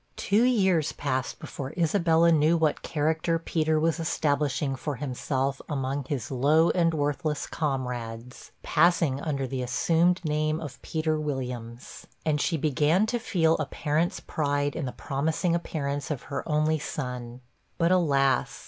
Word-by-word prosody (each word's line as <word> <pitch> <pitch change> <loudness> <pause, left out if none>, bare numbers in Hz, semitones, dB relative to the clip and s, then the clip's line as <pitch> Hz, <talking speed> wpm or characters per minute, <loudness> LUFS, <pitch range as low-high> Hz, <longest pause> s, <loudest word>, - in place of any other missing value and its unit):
Two 205 +3 +2
years 190 - +3
passed 130 -2 -2
before 135 -1 -7
Isabella 170 -1 +3
knew 160 +1 +4
what 155 -2 +1
character 160 +2 0
Peter 160 -1 0
was 165 +2 +1
establishing 145 -3 0
for 145 +2 -4
himself 135 0 -2
among 135 -1 -2
his 130 -4 -4
low 150 +6 +4
and 170 -2 +2
worthless 150 0 -1
comrades 125 -5 -4
passing 165 -6 +3
under 140 -4 -2
the 130 0 -3
assumed 170 +8 +2
name 155 +1 0
of 145 -5 -8
Peter 155 -1 -1
Williams; 125 -5 -5 0.2
and 150 -2 +1
she 165 - +1
began 155 +6 +2
to 240 +1 -1
feel 165 -8 +2
a - - -2
parent's 155 +3 -1
pride 145 -1 -1
in 160 - -2
the 125 - -3
promising 160 +7 -1
appearance 145 -4 -2
of 145 -5 -3
her - - -1
only 155 +1 +2
son. 125 -4 -5 0.4
But, 170 +1 +2
alas! 140 -7 +2
150 Hz, 145 wpm, -27 LUFS, 135-165 Hz, 0.4 s, knew